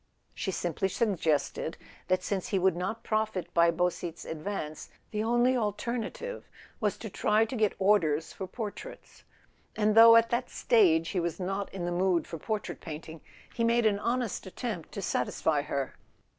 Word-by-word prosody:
She - - -3
simply 175 0 -1
suggested 165 -7 0 0.3
that 185 0 +1
since 195 +2 -2
he 210 -5 0
would 185 -1 +3
not 190 +6 -3
profit 215 -6 -1
by 170 0 +5
Beausite's 175 0 -2
advance 155 -1 -5 0.2
the 215 0 -1
only 240 +3 +3
alternative 235 - -3 0.3
was 210 -3 0
to 225 - -7
try 215 +2 +2
to 225 - -6
get 215 -3 +1
orders 170 -6 +2
for 190 - -6
portraits; 210 +1 -8 0.5
and 215 0 +2
though 230 +1 +9
at 230 0 +5
that 245 +1 0
stage 165 -8 +3
he 190 - -1
was 170 +1 -2
not 195 +2 -3
in 185 -3 -4
the 175 - -2
mood 175 -1 +2
for 165 - -7
por¬ 215 +6 -1
trait - - -7
painting, 160 0 -8 0.3
he 230 - -1
made 235 0 +3
an 205 -2 +3
honest 235 -3 -2
attempt 190 -3 -5
to 200 - -5
satisfy 145 +1 0
her. 140 -2 -3
195 Hz, 170 wpm, -29 LUFS, 170-225 Hz, 0.5 s, though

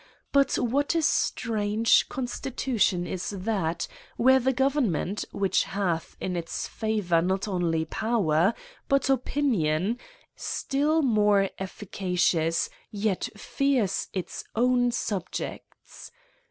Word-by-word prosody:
But 280 -1 +3
what 280 +7 +1
a 330 - +3
strange 220 -6 +2
constitution 245 -7 -1
is 180 +1 -4
that 190 -4 -2 0.3
where 260 +2 +5
the 260 +1 +2
government^ 255 - 0
which 195 -1 +1
hath 180 -5 -2
in 180 - -3
its 170 -1 -3
favour 210 -7 0
not 190 +4 0
only 170 -4 0
power, 195 -2 +1 0.3
but 275 -1 +3
opi 270 +2 0
nion, 195 - +1 0.4
still 300 +3 0
more 210 -5 +3
efficacious, 180 -4 0 0.2
yet 205 -2 -1
fears 260 -3 0
its 185 -2 -5
own 245 +1 +3
sub* 200 -6 -2
jects? - - -8
210 Hz, 110 wpm, -27 LUFS, 180-250 Hz, 0.4 s, where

